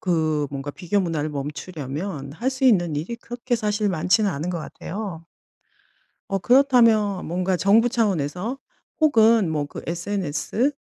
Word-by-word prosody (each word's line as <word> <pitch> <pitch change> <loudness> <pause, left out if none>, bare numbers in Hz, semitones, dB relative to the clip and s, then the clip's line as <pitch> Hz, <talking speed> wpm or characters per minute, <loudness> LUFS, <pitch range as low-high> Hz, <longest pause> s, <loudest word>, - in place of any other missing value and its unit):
그 155 -4 0
뭔가 140 +1 -5
비교 185 +5 -1
문화를 160 -4 -1
멈추려면 145 +1 -5
할 245 - -1
수 265 0 -3
있는 175 - +4
일이 170 +11 -4
그렇게 240 +1 -3
사실 210 -1 0
많지는 190 +4 +2
않은 155 +3 -4
것 175 -2 -2
같아요. 180 0 -6 1.1
어 195 - +1
그렇다면 230 -5 +4
뭔가 180 +2 0
정부 215 +6 +4
차원에서 205 - -1 0.4
혹은 225 - +5
뭐 150 -2 -1
그 - - -8
SNS 195 - -1
185 Hz, 285 characters per minute, -23 LUFS, 155-225 Hz, 1.1 s, 혹은